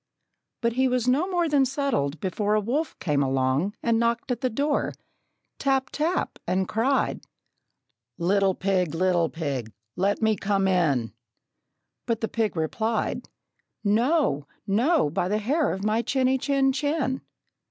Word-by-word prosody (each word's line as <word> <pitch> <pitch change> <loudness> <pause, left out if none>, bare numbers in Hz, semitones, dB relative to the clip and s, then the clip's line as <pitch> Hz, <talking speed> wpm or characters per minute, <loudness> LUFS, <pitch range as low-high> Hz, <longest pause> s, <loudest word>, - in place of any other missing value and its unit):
But 235 -1 +1
he 260 +2 +2
was 250 -1 0
no 280 +8 +3
more 350 -2 +1
than 290 -3 +3
settled, 265 - -1
before 205 +4 0
A - - +3
wolf 265 +10 -2
came 150 -5 0
along 135 - +1
and 230 -1 +2
knocked 235 +2 0
at 240 - -2
the 255 - +1
door, 285 +5 0 0.7
Tap 270 -1 +1
tap, 325 +5 -1
and 185 +1 +1
cried, 255 +5 0 1.0
"Little 190 +2 +2
pig, 185 -4 0
little 175 -2 +2
pig, 140 -9 -4 0.2
let 200 +2 +1
me 220 -1 +2
come 195 0 0
in!" 150 -11 +1 0.9
But 230 -2 -1
the 225 - 0
pig 220 -3 -1
replied, 220 +8 -1 0.5
"No, 225 - +2 0.2
no, 250 - +2
by 175 - 0
the 210 +3 +1
hair 280 +9 +1
of 190 - -4
my 215 +2 +2
chinny, 260 +2 +1
chin, 275 0 +2
chin!" 285 -2 -1
220 Hz, 145 wpm, -25 LUFS, 185-265 Hz, 1.0 s, no